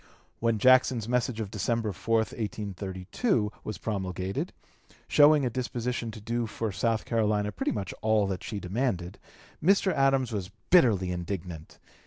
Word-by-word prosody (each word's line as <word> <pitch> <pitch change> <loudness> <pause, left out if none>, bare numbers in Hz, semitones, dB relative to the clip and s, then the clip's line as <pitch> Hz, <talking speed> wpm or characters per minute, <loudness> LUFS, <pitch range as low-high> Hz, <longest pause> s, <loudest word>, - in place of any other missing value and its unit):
When 115 -1 +1
Jackson's 130 -1 +4
message 125 -1 0
of 105 -3 -4
December 115 +1 -1
4, 95 +5 -1
1832, 105 - -1
was 110 - -5
promulgated, 95 -2 -3 0.6
showing 145 -1 +6
a - - +1
disposition 120 -1 -3
to 110 - -8
do 115 +2 -2
for 110 0 -3
South 110 +2 0
Carolina 105 -2 +1
pretty - - -2
much 100 -4 -4
all 110 -2 +3
that 95 -2 -3
she 105 - -4
demanded, 95 -2 -2 0.4
Mr. 195 +2 +4
Adams 135 -3 +2
was 100 -4 -3 0.2
bitterly 110 - +5
indignant. 90 -2 -5
110 Hz, 140 wpm, -28 LUFS, 95-120 Hz, 0.6 s, showing